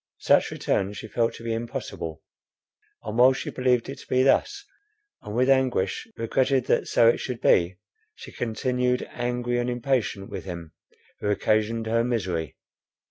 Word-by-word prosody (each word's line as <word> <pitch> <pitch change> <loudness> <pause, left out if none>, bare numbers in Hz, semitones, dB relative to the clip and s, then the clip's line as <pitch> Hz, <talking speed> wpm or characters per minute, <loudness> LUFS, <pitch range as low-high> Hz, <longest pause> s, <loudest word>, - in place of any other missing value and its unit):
Such - - +3
return 95 +1 -1
she 110 - -7
felt 115 +2 0
to - - -11
be 115 -1 -2
impossible; 85 -8 -5 0.8
and 110 +2 -3
while 130 +2 +7
she - - -5
believed 125 -2 +1
it 135 0 -7
to - - -14
be 130 0 +3
thus, 405 - +2 0.6
and 105 -1 -7
with 125 +2 +3
anguish 130 - +1
regretted 130 +2 +1
that - - +1
so 115 - +4
it 115 - +4
should 125 -3 -4
be, 90 +1 +3 0.4
she - - -11
continued 125 +2 -1
angry 120 0 -1
and 120 0 -1
impatient 120 -5 -1
with - - -5
him, 85 -4 -7 0.5
who 105 - -2
occasioned 110 +2 +1
her 115 +1 +1
misery. 90 - -2
115 Hz, 160 wpm, -25 LUFS, 105-125 Hz, 0.8 s, while